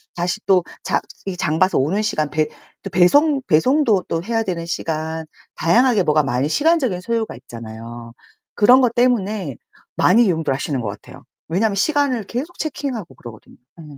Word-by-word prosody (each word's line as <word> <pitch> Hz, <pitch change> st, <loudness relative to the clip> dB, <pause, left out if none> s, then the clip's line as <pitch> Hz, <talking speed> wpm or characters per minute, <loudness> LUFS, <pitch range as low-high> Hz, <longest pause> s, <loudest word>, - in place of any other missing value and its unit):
다시 175 Hz, +4 st, -2 dB
또 185 Hz, -2 st, +4 dB, 0.2 s
자 -, -, +1 dB, 0.3 s
이 185 Hz, -2 st, -4 dB
장 155 Hz, -1 st, -1 dB
봐서 185 Hz, +1 st, +3 dB
오는 165 Hz, +10 st, +1 dB
시간, 155 Hz, -8 st, -1 dB
배 155 Hz, 0 st, 0 dB, 0.4 s
또 195 Hz, -, -5 dB
배송 270 Hz, -, +4 dB
배송도 220 Hz, -, +3 dB
또 165 Hz, -, -2 dB
해야 225 Hz, +2 st, -1 dB
되는 175 Hz, -5 st, -4 dB
시간 160 Hz, -1 st, -3 dB, 0.3 s
다양하게 225 Hz, +4 st, +3 dB
뭐가 155 Hz, -2 st, +3 dB
많이 135 Hz, +1 st, -1 dB
시간적인 285 Hz, -, +1 dB
소요가 225 Hz, -1 st, -2 dB
있잖아요. 115 Hz, 0 st, -10 dB, 0.4 s
그런 250 Hz, +5 st, +6 dB
것 245 Hz, -3 st, +2 dB
때문에 215 Hz, -, 0 dB, 0.4 s
많이 230 Hz, +6 st, +4 dB
이용들 160 Hz, -7 st, 0 dB
하시는 135 Hz, 0 st, -2 dB
것 110 Hz, -, -3 dB
같아요. 100 Hz, -, -11 dB, 0.2 s
왜냐하면 200 Hz, +5 st, 0 dB
시간을 270 Hz, -1 st, +1 dB
계속 275 Hz, -, -5 dB
체킹하고 270 Hz, -, -4 dB
그러거든요. 115 Hz, -3 st, -13 dB, 0.2 s
어. 165 Hz, -, -11 dB
185 Hz, 350 characters per minute, -20 LUFS, 155-235 Hz, 0.4 s, 그런